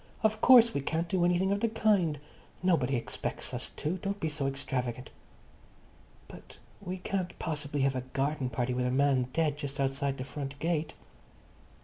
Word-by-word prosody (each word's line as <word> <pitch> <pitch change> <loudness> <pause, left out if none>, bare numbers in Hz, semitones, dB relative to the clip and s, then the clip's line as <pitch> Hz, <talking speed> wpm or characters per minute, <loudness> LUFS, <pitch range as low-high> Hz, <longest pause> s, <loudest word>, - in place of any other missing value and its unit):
Of 220 0 +2
course 240 -2 +8
we 140 - -1
can't 165 +4 -1
do 180 0 +1
anything 180 +2 +2
of 200 - +1
the 230 - +1
kind. 205 -8 +2 0.5
Nobody 140 -8 +2
expects 120 - -3
us - - -3
to. 160 +5 -2
Don't 200 +2 -3
be 160 - -1
so 145 -2 -2
extravagant." 130 -2 -3 1.2
"But - - -13 0.2
we 185 -1 -4
can't 185 0 -3
possibly 145 -2 -3
have 135 0 +2
a 130 - -1
garden 135 +1 -2
party 125 0 -1
with 125 0 0
a - - +1
man 130 -1 +2
dead 150 0 +1
just 140 0 -5
outside 135 0 0
the 130 - -4
front 140 0 -6
gate." 160 0 -1
145 Hz, 170 wpm, -30 LUFS, 135-180 Hz, 1.2 s, course